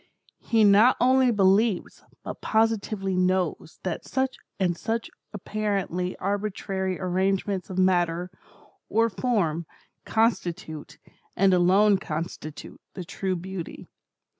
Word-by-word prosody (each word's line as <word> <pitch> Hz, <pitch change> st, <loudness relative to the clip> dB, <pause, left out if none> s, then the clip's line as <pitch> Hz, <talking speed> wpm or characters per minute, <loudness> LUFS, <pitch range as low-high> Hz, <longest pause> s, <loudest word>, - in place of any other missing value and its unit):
He 225 Hz, -2 st, +2 dB
not 210 Hz, +5 st, +6 dB
only 260 Hz, +1 st, +4 dB
believes, 205 Hz, -1 st, +2 dB, 0.2 s
but -, -, -7 dB
positively 215 Hz, -3 st, 0 dB
knows, 185 Hz, -3 st, 0 dB
that 180 Hz, -3 st, -3 dB
such 265 Hz, 0 st, -1 dB, 0.2 s
and 180 Hz, -3 st, +1 dB
such 225 Hz, +6 st, -3 dB, 0.2 s
apparently 200 Hz, -3 st, -2 dB
arbitrary 195 Hz, -2 st, -2 dB
arrangements 190 Hz, +1 st, -1 dB
of 185 Hz, -, -6 dB
matter, 180 Hz, -1 st, +1 dB, 0.6 s
or 225 Hz, +1 st, +2 dB
form, 175 Hz, -8 st, 0 dB, 0.4 s
constitute, 180 Hz, -9 st, -1 dB, 0.4 s
and 195 Hz, 0 st, +4 dB
alone 190 Hz, +3 st, +4 dB
constitute, 155 Hz, -1 st, -6 dB
the 180 Hz, -, -6 dB
true 190 Hz, +1 st, -2 dB
Beauty. 180 Hz, 0 st, -7 dB
190 Hz, 105 wpm, -26 LUFS, 180-215 Hz, 0.6 s, not